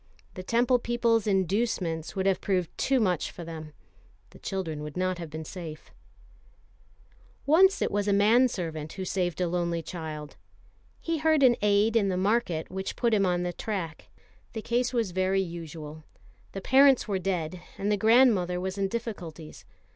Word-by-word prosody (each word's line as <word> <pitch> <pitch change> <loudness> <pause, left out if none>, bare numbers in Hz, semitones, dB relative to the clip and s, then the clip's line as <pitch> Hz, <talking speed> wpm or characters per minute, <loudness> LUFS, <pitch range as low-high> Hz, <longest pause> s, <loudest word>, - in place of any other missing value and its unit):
The 185 - -7
Temple 240 +5 +2
people's 235 -2 +1
inducements 190 -4 0
would 190 -1 -1
have 195 -1 +2
proved 180 -4 -1
too 270 -1 +1
much 180 -7 0
for 175 - -9
them. 160 -2 -8 0.6
The - - -15
children 165 -6 -4
would 150 +1 -7
not 185 -1 -1
have 165 -2 -6
been 155 +1 -7
safe. 155 - -9 1.5
Once 370 +7 +5
it - - -1
was 205 0 -1
a - - +3
man 215 +6 +5
servant 160 -8 -5
who 190 - -5
saved 180 -3 -2
a 180 - +1
lovely 170 -1 -1
child. 155 -3 -7 0.6
He 330 -1 -2
heard 310 -2 +3
an 245 -2 +6
aside 210 +2 +3
in 205 -4 +3
the 185 - -1
market 190 -5 0
which 190 +1 -4
put 235 -2 +1
him 200 -3 +3
on 180 0 0
the 175 0 -3
track. 165 - -5 0.5
The 220 -2 -5
case 245 +1 0
was 230 -6 -1
very 190 +1 +1
usual. 160 -4 -6 0.5
The 195 - -5
parents 270 +2 +5
were 195 -3 -1
dead, 180 -2 -3 0.2
and 205 +2 -1
the - - +4
grandmother 215 -5 +4
was 190 +2 -4
in 195 - +1
difficulties. 185 -8 -7
190 Hz, 170 wpm, -27 LUFS, 170-225 Hz, 1.5 s, an